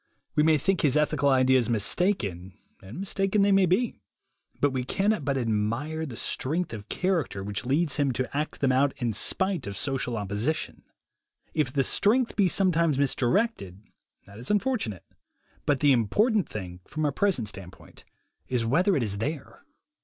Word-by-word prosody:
We 150 - +4
may 155 0 +4
think 190 +5 0
his 145 -1 +2
ethical 150 -2 +2
ideas 130 -2 +3
mistaken, 100 - 0 0.2
and 100 - -9
mistaken 195 +1 0
they 200 - +3
may 195 -1 +4
be; 210 +8 +1 0.7
but 145 - +2
we 130 -1 -2
cannot 195 +6 0
but 140 -1 -1
admire 120 +8 -1
the 120 -5 -8
strength 160 +2 -2
of 105 -2 -8
character 165 - -1
which 100 +2 -4
leads 150 +3 +1
him 140 -2 +1
to 130 +3 -3
act 150 +2 -3
them 135 -2 +3
out 135 +2 +2
in 120 -4 -1
spite 190 - +1
of 100 -1 -5
social 125 -3 -2
opposition. 105 +9 -2 0.7
If 150 -6 0
the 135 0 +1
strength 230 - +1
be 200 -3 +3
sometimes 170 -5 +2
mis 140 -1 +2
directed, 120 - -1 0.4
that 100 +2 -13
is 125 - -7
unfortunate; 210 - -1 0.6
but 145 -3 +1
the 145 - +5
important 200 - +2
thing, 90 -4 -7
from 155 0 -3
our 145 - +1
present 155 - 0
standpoint, 95 -3 -10 0.4
is 120 -1 -1
whether 175 - +2
it 130 - 0
is 100 -2 -2
there. 140 +5 -5
140 Hz, 170 wpm, -26 LUFS, 115-180 Hz, 0.7 s, the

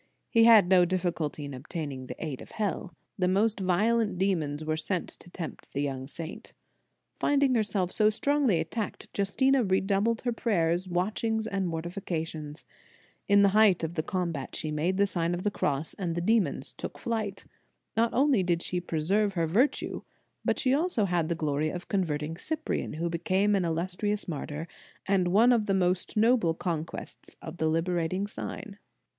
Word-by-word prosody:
He 230 -1 +6
had 220 -5 +8
no 185 -1 +6
diffi 180 0 +1
culty 150 -2 -4
in 140 - -7
obtaining 135 -1 -6
the - - -6
aid 145 -5 -5
of - - -12
hell. 195 -4 -3 0.2
The 180 - +2
most 205 +4 +2
violent 205 +2 +2
demons 160 -6 0
were 155 0 0
sent 170 +3 -2
to - - -15
tempt 170 -2 -8
the 140 - -1
young 135 -2 -3
saint. 160 +3 -8 0.6
Finding 280 -2 +2
herself 200 -5 0
so 215 -1 +4
strongly 260 - +2
attacked, 205 +7 -4
Justina 260 +7 +2
redoubled 200 +3 +1
her 245 - 0
prayers, 180 -5 0
watchings 215 +5 0
and 195 -4 -1
mortifications. 165 -3 -4 0.6
In 200 0 +6
the 200 - +6
height 205 -3 +4
of 160 +1 -2
the 155 - 0
combat 170 -6 -3
she 155 - -3
made 165 +5 0
the 200 - +4
Sign 175 -3 -1
of 175 - -5
the 210 - +1
Cross, 145 -3 -1
and 170 -4 -2
the - - -1
demons 220 +3 +1
took - - -7
to - - -13
flight. 220 -4 -3 0.5
Not 230 +1 +2
only 270 -5 +3
did 175 -2 0
she 180 -1 -2
preserve 190 +6 0
her 165 -2 +1
virtue, 220 - +1 0.4
but - - +1
she 255 - +1
had 275 - +4
also 325 - +1
the 170 -2 0
glory 155 -1 0
of 175 +2 -6
converting 160 -4 -1
Cyprian, 315 - -3
who 165 +3 -2
became 185 +5 +1
an 190 -3 +2
illustrious 185 +6 -1
martyr, 150 0 -5 0.4
and 190 -2 +2
one 220 +7 +5
of 225 -3 +1
the 195 - +2
most 185 +2 0
noble 220 -7 +3
conquests 165 -1 -5
of 160 +2 -8
the 160 - +1
liberating 175 +3 0
sign. 205 0 -7
185 Hz, 175 wpm, -28 LUFS, 165-210 Hz, 0.6 s, had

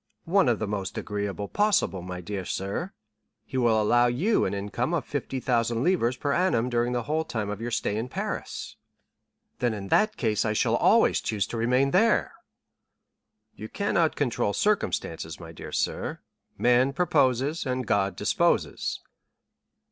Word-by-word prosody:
"One 190 -2 +3
of 115 - +2
the 110 - -2
most 100 -2 -4
agreeable 100 0 -3
possible, 205 - +1
my 90 0 -6
dear 100 +1 -4
sir; 100 - -3 0.5
he - - -10
will 120 -4 +3
allow 120 +3 +4
you 165 - +1
an - - -2
income 120 +10 -2
of 160 - -2
50,000 125 -4 -1
livres 145 -9 +1
per 145 +1 -1
annum 135 -10 +1
during 120 0 +1
the 120 -1 -1
whole 155 +5 -1
time 110 -9 -3
of 105 +1 -6
your 120 - -3
stay 110 -3 -1
in 115 +3 -3
Paris." - - -5 0.8
"Then 120 -3 0
in 100 -2 -7
that 215 0 +3
case 110 -3 +1
I 110 - 0
shall - - +2
always - - +4
choose 105 -3 -1
to - - -7
remain 125 +4 +2
there." 220 +5 +3 1.2
"You 110 - -9
cannot 175 -5 +1
control 120 -7 0
circumstances, 90 - -1
my 85 -2 -9
dear 80 - -9
sir; - - -2 0.4
'man 125 +3 +3
proposes, 145 -3 +1
and 130 -1 -1
God 100 -2 +1
disposes. - - 0
120 Hz, 155 wpm, -26 LUFS, 105-145 Hz, 1.2 s, allow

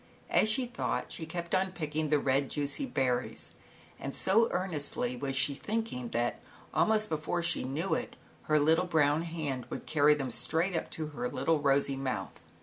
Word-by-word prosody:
As 215 - +4
she 250 +4 +3
thought, 240 0 -3
she 160 - -5
kept 170 +1 -5
on 190 0 +1
picking 155 -2 -2
the 150 - +4
red, 140 0 +1
juicy 145 - -1
berries, 125 - -1 0.5
and 135 - -4
so 225 +5 +4
earnestly 145 -8 -2
was 135 +2 -3
she 140 +1 +2
thinking 200 - -3
that 120 +1 -1 0.3
almost 215 0 +3
before 160 +1 -1
she 170 - +2
knew 150 +9 -1
it, - - -2 0.3
her 155 0 +3
little 160 +4 +3
brown 155 -2 +3
hand 155 -7 -4
would - - -6
carry 150 -1 +4
them 135 -4 -3
straight 165 +9 0
up 165 - -2
to 155 -2 -4
her 125 -5 -3
little 150 +4 +1
rosy 140 -1 +2
mouth. 135 -1 -3
150 Hz, 175 wpm, -31 LUFS, 135-175 Hz, 0.5 s, As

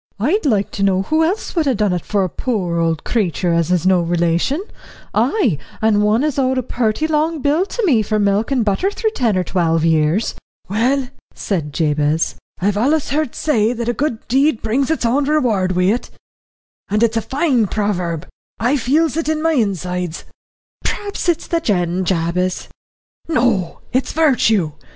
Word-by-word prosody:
"I'd 310 - +1
like 205 -6 +1
to 200 - -5
know 195 -1 +2
who 315 +9 +1
else 380 +6 -2
would 320 -4 +1
ha' 265 - +2
done 205 -3 +1
it 175 - -2
for 205 -2 0
a - - 0
poor 180 -4 -2
old 165 -2 0
creetur 180 -5 0
as 170 0 +1
is 180 -1 +1
no 185 -2 +4
relation; 170 - 0 0.5
ay 240 - +1 0.2
and 220 -1 +3
one 215 +5 +2
as 300 -2 0
owed 260 0 +1
a 255 - 0
purty 235 +4 -1
long 315 +1 0
bill 300 +7 +1
to 470 0 -2
me 255 - +4
for 215 +1 -1
milk 205 +1 +1
and 255 -5 +1
butter 210 - +1
through 440 +2 -1
ten 235 - 0
or 185 - +1
twelve 165 -2 +1
years." 160 +6 +2 0.3
"Well," 250 +6 0 0.3
said 165 -7 -2
Jabez, 150 +1 0 0.3
"I've 200 +2 0
allus 280 +7 +1
heard 300 -3 -1
say 235 -6 +1
that 235 -1 -4
a - - +1
good 250 -4 -3
deed 270 0 +2
brings 255 +5 0
its 320 -6 0
own 270 +5 +2
reward 235 -11 +1
wi' 180 +3 +2
it 245 - -4 0.8
and 210 +3 +1
it's 230 0 +2
a - - +1
fine 265 -4 +1
proverb. 180 -6 -2 0.3
I 250 +5 +2
feels 300 +6 +1
it 325 -1 -1
in 315 -1 0
my 325 +1 +1
insides." 180 - -2 0.6
"P'raps 405 -3 -2
it's 340 - 0
the 335 - 0
gin, 185 - 0
Jabez." 180 +1 -1 0.6
"No 235 - 0
it's 260 +1 0
virtue. 225 - +2
220 Hz, 180 wpm, -18 LUFS, 180-280 Hz, 0.8 s, no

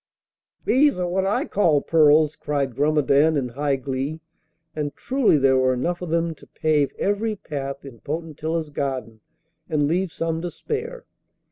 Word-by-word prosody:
'Those 285 -1 +4
are 180 -1 -1
what 190 +2 0
I 200 - +1
call 165 -7 +3
pearls,' 155 0 +4
cried 140 -3 -2
Grumedan 150 +1 +3
in 130 -3 -1
high 140 +3 0
glee. 135 +4 -3 0.6
And 145 -2 -3
truly 260 - +2
there 135 -1 +4
were 130 0 +2
enough 175 +8 -2
of 180 - -5
them 165 0 0
to 155 - -18
pave 150 -3 +1
every 210 +2 0
path 140 -6 -6
in 125 -4 -11
Potentilla's 160 0 -4
garden 130 -6 -3 0.5
and 150 -3 +1
leave 180 +3 0
some 165 0 -2
to 175 - -3
spare! 465 - -5
155 Hz, 155 wpm, -23 LUFS, 140-175 Hz, 0.6 s, Those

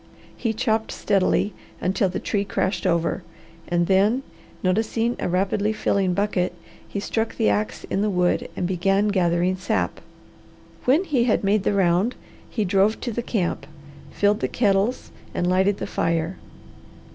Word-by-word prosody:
He 230 - -1
chopped 220 0 0
steadily 195 +1 +1 0.3
until 190 +1 +1
the 180 - -3
tree 205 -2 -1
crashed 195 -1 -1
over, 170 -2 +1 0.5
and 175 0 +1
then, 205 +8 +3 0.4
noticing 225 +5 +1
a - - -1
rapidly 195 +3 +1
filling 195 -4 +1
bucket, 200 -2 0 0.3
he 200 - -4
struck 225 +2 -2
the 105 - +3
ax 105 +1 -1
in 195 - -2
the 210 - +1
wood 180 -2 +1
and - - -1
began 195 +3 +2
gathering 180 -1 +1
sap. 185 - -1 0.8
When 285 +8 +4
he 270 -10 +1
had 230 - +2
made 200 +1 +3
the 205 - +1
round, 190 +4 +2 0.3
he 215 -3 -1
drove 200 +3 +2
to 240 - -2
the 240 - -2
camp, 180 - -2 0.4
filled 205 +1 +2
the - - 0
kettles, 205 +1 +1 0.2
and 175 - 0
lighted 190 +2 +2
the - - -4
fire. 165 +2 -1
195 Hz, 155 wpm, -23 LUFS, 180-215 Hz, 0.8 s, When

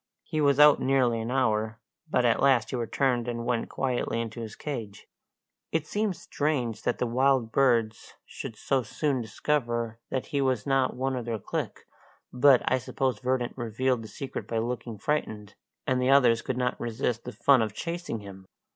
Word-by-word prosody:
He 155 -2 -2
was 140 -1 +3
out 150 -1 +8
nearly 125 -4 +2
an 115 - -4
hour, 110 -4 0 0.3
but 125 -4 +2
at 115 - +3
last 130 -5 +3
he - - -2
returned 125 0 0
and 120 -1 -3
went 120 -2 -1
quietly 125 -3 -1
into 115 0 -4
his 110 -1 -7
cage. 115 -9 -6 0.7
It 160 -2 0
seemed 205 +2 -1
strange 140 -9 -2
that - - -1
the - - 0
wild 130 -1 +2
birds 115 -5 +1
should 115 - -8
so 135 +5 0
soon 130 +3 -1
discover 120 0 -2
that 130 - -2
he 140 - +2
was 130 -6 0
not 135 -2 +1
one 130 +1 -1
of 125 -2 -4
their 115 -1 -2
clique, 100 - -5 0.5
but 130 0 +5
I 130 - +2
suppose 130 -2 -2
Verdant 125 +1 -1
revealed 120 +1 -1
the 110 - -8
secret 135 +4 -6
by 115 - -2
looking 115 -1 -3
frightened, 105 -5 -2 0.3
and 130 -1 +1
the 125 - +2
others 125 -4 +5
could 130 - -3
not 125 -1 -1
resist 120 0 -2
the - - -6
fun 125 +4 +4
of 110 -1 -2
chasing 170 -9 -4
him. 95 -2 -11
125 Hz, 180 wpm, -27 LUFS, 115-135 Hz, 0.7 s, out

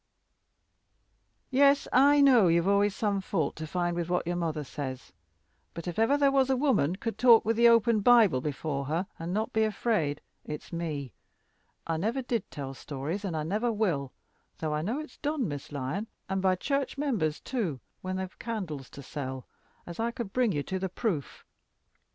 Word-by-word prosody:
"Yes, 280 +2 +4
I 285 +3 +6
know 250 -8 +6
you've 170 +1 +3
always 200 0 +3
some 200 -2 0
fault 165 -6 -1
to 155 0 -5
find 175 +1 -1
with 170 0 -2
what 180 -1 0
your 175 +1 -1
mother 160 -3 -2
says. 130 -6 -6 0.6
But 170 +1 -6
if 175 +3 -3
ever 225 +6 +4
there 280 -1 +4
was 270 -1 +3
a 265 - +2
woman 230 - +2
could 220 +1 -5
talk 235 -2 +7
with 225 +1 +2
the 235 +1 +6
open 230 -1 +4
Bible 210 - +5
before 140 -1 -3
her, 165 +6 -1
and 165 +1 -4
not 215 +4 -1
be 220 - +3
afraid, 210 -9 0 0.2
it's 150 +3 -7
me. 150 - -4 0.7
I 165 -1 -1
never 230 +10 -1
did 235 -4 -2
tell 135 -2 -6
stories, 145 +8 -5
and 175 -5 -2
I 155 - -1
never 210 +9 0
will 170 - -1 0.5
though 155 -1 -2
I 150 - 0
know 220 - -2
it's 310 - -9
done, 290 -5 -1
Miss 145 -2 -6
Lyon, 145 +10 -3 0.2
and 190 0 -1
by 185 -1 +3
church 275 +9 -2
members 215 - 0
too, 200 - -3 0.2
when 185 0 -3
they 190 - -2
have 185 - -10
candles 180 - -5
to 140 - -11
sell, 130 -2 -5 0.4
as 170 +2 -9
I 230 +1 +1
could 235 -5 -6
bring 250 -4 +2
you 145 -5 -1
to 190 +4 -3
the 190 0 -2
proof. 180 - -3
190 Hz, 190 wpm, -29 LUFS, 155-230 Hz, 0.7 s, talk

